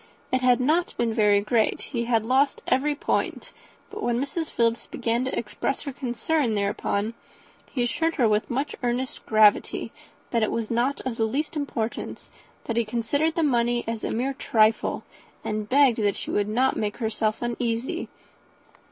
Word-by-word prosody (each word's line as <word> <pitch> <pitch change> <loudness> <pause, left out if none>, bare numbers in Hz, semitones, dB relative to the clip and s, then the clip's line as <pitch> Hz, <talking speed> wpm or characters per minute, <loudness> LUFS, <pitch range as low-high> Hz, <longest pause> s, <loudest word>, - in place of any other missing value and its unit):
It 255 - +3
had 250 -1 +4
not 315 +7 +1
been 235 -1 +1
very 210 -2 +4
great; 220 +1 +1
he 235 -3 -3
had 225 -2 +1
lost 270 +4 +2
every 290 +3 +1
point; - - -2 0.4
but 425 +1 -6
when 240 -7 0
Mrs. 300 +4 -3
Philips 230 0 0
began 235 +2 -1
to 260 - -2
express 235 +4 -2
her 280 -2 -5
concern 250 0 0
thereupon, 200 +1 -1 0.6
he 250 - -1
assured 325 +7 0
her, 240 - +3
with 210 0 +1
much 275 +4 -2
earnest 250 +1 -2
gravity, 215 -1 +3 0.4
that 235 - +2
it 220 - +1
was 230 -1 -2
not 245 +4 +1
of 245 -3 -3
the 225 - +2
least 285 +8 -2
importance; 240 -6 -4 0.3
that 230 - -3
he 235 - +4
considered 240 +8 0
the 330 - +1
money 240 -3 +2
as 225 -1 -3
a - - -1
mere 260 +4 -1
trifle, 225 -4 +2 0.4
and 215 0 -3
begged 240 -7 +4
she - - -5
would 205 0 0
not 255 +5 +2
make 210 -1 -2
herself 220 -1 -1
uneasy. 240 +6 -2
240 Hz, 170 wpm, -25 LUFS, 220-270 Hz, 0.6 s, had